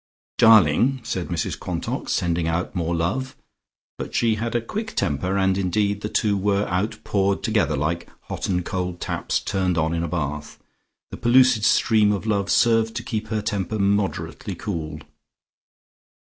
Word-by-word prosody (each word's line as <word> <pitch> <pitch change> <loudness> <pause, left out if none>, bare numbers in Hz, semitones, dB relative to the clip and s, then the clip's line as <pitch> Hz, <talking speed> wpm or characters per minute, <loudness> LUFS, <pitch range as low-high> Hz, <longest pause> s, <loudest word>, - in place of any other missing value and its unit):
"Darling!" 115 - +5
said 95 -6 -3
Mrs 85 -3 -3
Quantock, - - -4
sending 85 -1 0
out 85 +2 -2
more 85 -1 -1
love. 115 +11 -2 0.6
But - - -6
she 115 -2 +3
had 115 +2 -3
a - - +3
quick 215 - -5
temper, 90 +7 0
and 95 0 +2
indeed 100 +2 0
the 105 - -3
two 105 -1 +1
were 100 +1 +1
outpoured 100 +1 -1
together, 105 -9 +1
like 85 +4 -2
hot - - -5
and 90 -2 0
cold 90 -2 -3
taps - - -2
turned 95 -3 -1
on 80 +1 +1
in 85 - -1
a 85 - -2
bath. 75 -2 -4 0.5
The - - -6
pellucid 125 -1 +4
stream 110 -2 +4
of 100 - -4
love 100 -3 0
served 115 -1 +3
to - - -3
keep 110 -1 -3
her 105 -1 -2
temper 100 +1 -2
moderately 100 0 -1
cool. 80 -6 -5
100 Hz, 160 wpm, -23 LUFS, 85-110 Hz, 0.6 s, Darling